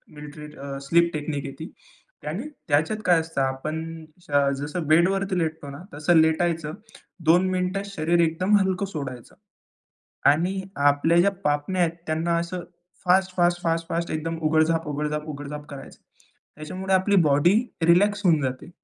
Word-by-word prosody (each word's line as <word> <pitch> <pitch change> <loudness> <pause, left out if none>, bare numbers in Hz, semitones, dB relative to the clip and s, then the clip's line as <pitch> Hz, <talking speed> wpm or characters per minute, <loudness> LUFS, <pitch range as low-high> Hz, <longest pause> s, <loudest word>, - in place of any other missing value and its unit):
Military 150 +1 -9
अ, 140 0 -6
sleep 170 +5 +3
technique 145 -2 -3
आहे 135 - -6
ती 160 +4 -7 0.6
आणि 190 - -4 0.2
त्याच्यात 155 +8 +1
काय 175 -2 +5
असतं. 160 -3 -3
आपण 155 +5 -3 0.2
स - - -14 0.3
जसं 150 +2 -4
बेडवरती 185 +4 +2
लेटतो 160 -3 -3
ना, 140 +5 -9
तसं 155 +3 +2
लेटायचं 160 -1 0 0.6
2 180 +3 +5
मिनिटं 185 +2 -1
शरीर 170 -3 0
एकदम 170 +5 +2
हलकं 190 0 0
सोडायचं 135 -9 -7 1.0
आणि 180 +6 -1 0.3
आपल्या 145 +4 +3
ज्या 200 +3 +4
पापण्या 150 +5 0
आहेत 170 - +2 0.2
त्यांना 165 +2 0
असं 170 +1 -4 0.4
फास्ट-फास्ट-फास्ट-फास्ट 175 -2 +1
एकदम 165 +1 -3
उघड-झाप, 160 +1 +2
उघड-झाप, 150 +1 -3
उघड-झाप 145 0 -7
करायचं. 140 -1 -10 0.6
त्याच्यामुळे 185 +5 -4
आपली 190 +2 +3
बॉडी 145 +6 +4 0.3
रिलॅक्स 205 +5 +4
होऊन 160 -4 +4
जाते 130 +1 -4
165 Hz, 135 wpm, -24 LUFS, 150-180 Hz, 1.0 s, काय